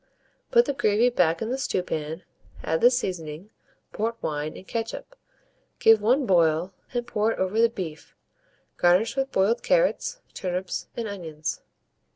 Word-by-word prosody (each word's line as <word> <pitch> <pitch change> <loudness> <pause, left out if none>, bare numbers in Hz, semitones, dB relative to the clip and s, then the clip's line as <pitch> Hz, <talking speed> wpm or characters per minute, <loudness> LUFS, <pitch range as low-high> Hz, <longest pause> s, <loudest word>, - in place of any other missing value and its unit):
Put 475 0 +5
the - - -1
gravy 220 -1 +3
back 165 -6 +2
in 225 - -3
the 265 - -2
stewpan, 160 - -3 0.4
add 160 +1 0
the 245 - +8
seasoning, 180 -6 -3 0.4
port 225 +2 -1
wine, 150 +1 -3
and 190 - -13
ketchup, 230 - -5 0.6
give 225 -1 +6
one 255 +6 +3
boil, 170 -1 +2 0.2
and 240 -1 -2
pour 220 -2 0
it - - -8
over 190 +4 +1
the 230 - +5
beef; 180 -9 -7 0.6
garnish 185 +7 +3
with 270 0 0
the - - -35
boiled 205 +5 +2
carrots, - - +1
turnips, 180 0 -3
and 230 -2 -2
onions. 160 -6 -5
205 Hz, 155 wpm, -25 LUFS, 170-235 Hz, 0.6 s, the